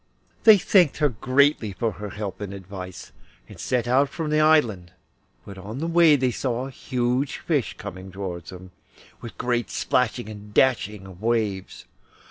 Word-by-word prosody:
They 220 -2 +9
thanked 180 -5 +3
her 150 -2 +3
greatly 130 -1 +2
for 110 +5 -1
her 105 0 -7
help 105 +1 -6
and 100 -1 -5
advice, 95 -1 -9 0.4
and - - -13
set 125 -2 -1
out 135 +3 +3
from 155 0 -4
the 155 - +3
island, 120 - +3 0.5
but 100 -1 -10
on 105 +5 -7
the 155 - -3
way 165 -2 +5
they 130 -2 +1
saw 125 0 -2
a 135 - -8
huge 125 +2 -1
fish - - -1
coming 95 +1 -8
towards 90 -3 -6
them, 90 0 -11 0.5
with 115 - -9
great 120 -1 -1
splashing 125 -2 0
and 105 -1 -11
dashing 105 -6 +2
of 95 -1 -13
waves. 110 -5 -2
115 Hz, 165 wpm, -24 LUFS, 100-135 Hz, 0.5 s, They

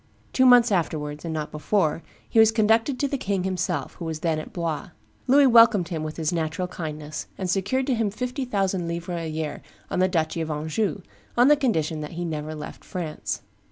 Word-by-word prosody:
Two 260 0 +5
months 245 -2 +7
afterwards, 150 -5 -1
and 165 - -3
not 155 -1 -3
before, 155 0 0 0.3
he 225 - +2
was 220 0 +7
conducted 225 +4 +2
to 285 - +1
the 275 -1 -2
king 195 -4 -1
himself, 185 -1 -2
who 170 - -8
was 160 -1 -4
then 160 -2 0
at 155 - -8
Blois. 170 +1 -3 0.4
Louis 280 +2 +6
welcomed 230 -7 +6
him 165 -4 -3
with 155 0 -5
his 160 +1 -1
natural 165 +2 -1
kindness, 155 -3 -6
and 190 - -3
secured 200 +9 0
to 265 - +1
him 225 -3 +1
fifty 250 +6 -3
thousand 195 -7 -1
livres 170 +1 -3
a 165 - -4
year 155 -1 -4 0.3
on - - 0
the 185 - +4
duchy 165 -2 -1
of 160 - -3
Anjou, 155 +4 -2 0.3
on 260 +5 +7
condition 165 - 0
that 150 +2 -6
he 175 +1 -3
never 155 -1 -4
left 150 - -8
France. 165 -4 -4
175 Hz, 200 wpm, -25 LUFS, 155-220 Hz, 0.4 s, months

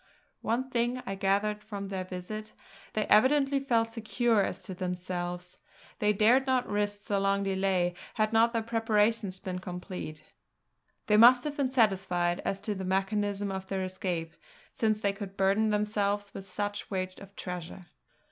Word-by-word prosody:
One 255 +3 -1
thing 240 +1 0
I 195 - -3
gathered 200 +2 0
from 200 -2 -6
their 190 -1 -3
visit; 200 +4 -6 0.4
they 215 - 0
evidently 275 +5 +4
felt 230 -4 +1
secure 225 0 +1
as - - -2
to 190 - -6
themselves. 180 -1 -4 0.4
They 210 0 +3
dared 230 +6 +4
not 255 -1 +2
risk 205 0 -1
so 200 -1 0
long 200 0 +1
delay 190 -2 +1 0.2
had 215 0 +1
not 230 +1 +5
their 230 -2 -1
preparations 220 -3 +1
been 185 -1 -4
complete; 180 -4 -6
and - - -27 0.8
they 210 - +4
must 245 +3 +8
have 295 -1 -3
been 275 -3 0
satisfied 190 -7 +2
as 195 - -1
to 210 +1 -2
the 190 -1 -5
mechanism 200 +1 0
of 190 0 -5
their 190 -1 -2
escape 180 -3 -3 0.4
since 215 -1 +1
they 200 -1 +1
could 195 -1 -8
burden 200 +3 +3
themselves 205 -1 0
with 195 0 -8
such 205 +2 -3
weight 185 -1 -3
of 200 0 -13
treasure. 180 0 -6
205 Hz, 165 wpm, -29 LUFS, 190-220 Hz, 0.8 s, must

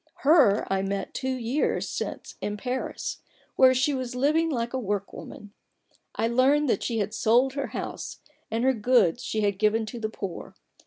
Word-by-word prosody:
Her 275 -9 +5
I 190 - +1
met 195 0 -3
two 260 -1 -2
years 255 +4 -1
since - - -5
in 210 0 -3
Paris, 250 +5 -4 0.3
where 260 0 +6
she 265 +3 +2
was 255 -2 -4
living 305 +5 +2
like 240 -4 -2
a 260 - -1
work 205 -3 -3
woman, 205 -1 -10 0.6
I 225 - +1
learned 270 +5 +3
that 205 - +1
she 230 - -2
had 205 -1 -1
sold 245 +4 +3
her 280 -1 -2
house, - - -6 0.3
and 225 +2 -1
her 265 +1 +4
goods 225 -6 +2
she 215 - -2
had 200 -2 0
given 220 +1 +2
to 235 +2 -7
the 220 -1 -2
poor. 195 -5 -7
235 Hz, 180 wpm, -26 LUFS, 210-260 Hz, 0.6 s, where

